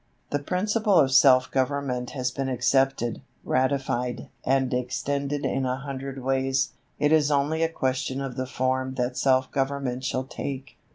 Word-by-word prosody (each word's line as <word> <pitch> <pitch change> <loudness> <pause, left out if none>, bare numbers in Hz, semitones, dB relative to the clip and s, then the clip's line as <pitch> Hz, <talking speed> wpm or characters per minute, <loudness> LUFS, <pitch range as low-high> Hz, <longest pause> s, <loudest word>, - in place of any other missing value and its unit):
The 145 - +1
principle 205 +6 +1
of 135 -3 +4
self 130 -1 +6
government 130 -2 -1
has 125 -1 0
been 135 +1 -3
accepted, 130 -1 +1 0.2
ratified, 130 -2 -1
and 130 -1 +1
extended 140 +3 -2
in 135 - 0
a 130 0 0
hundred 135 -1 -6
ways. 135 0 +1 0.3
It 150 +1 +2
is 155 -2 +4
only 150 +2 +1
a 165 - +2
question 130 -3 -1
of 135 -3 -4
the 130 0 -3
form 130 0 -1
that 125 -1 -1
self 130 -1 +2
government 135 -2 -1
shall 130 0 -1
take. 135 0 -6
135 Hz, 155 wpm, -26 LUFS, 130-140 Hz, 0.3 s, self